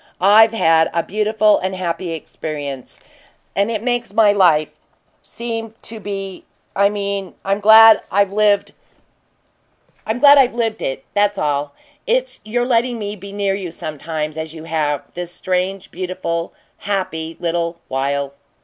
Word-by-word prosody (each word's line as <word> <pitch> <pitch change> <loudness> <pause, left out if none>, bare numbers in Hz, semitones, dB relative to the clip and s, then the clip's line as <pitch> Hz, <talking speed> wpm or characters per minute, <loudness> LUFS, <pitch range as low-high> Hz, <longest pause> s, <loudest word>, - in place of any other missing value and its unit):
I've 215 +4 +6
had 165 -6 +3
a 170 - +1
beautiful 215 +1 +2
and 190 +1 -3
happy 175 -1 -3
experience, 145 -4 -7 0.6
and 200 +2 +1
it 220 -2 -3
makes 240 -4 -2
my 220 -2 +5
life 170 -7 +3 0.5
seem 225 -1 -6
to 225 0 -6
be 195 -2 -6 0.3
I 200 +1 +4
mean 200 -2 -4
I'm 195 +1 0
glad 220 +1 +8
I've 200 0 +2
lived 205 -1 +2 1.3
it! 240 - +3
That's 205 0 +2
all; 145 -2 -1 0.3
it's - - 0
your 240 +3 -1
letting 240 0 +1
me 205 -1 -5
be 200 0 -10
near 200 -1 -1
you 195 -2 -4
sometimes, 155 -1 -5
as 160 0 -6
you 160 - -9
have, 150 -3 -1
this 175 0 -5
strange, 185 +2 -2
beautiful, 175 -2 -4 0.3
happy 165 -5 -3
little 170 0 -2
while!" 140 +1 -2
195 Hz, 130 wpm, -19 LUFS, 165-215 Hz, 1.3 s, glad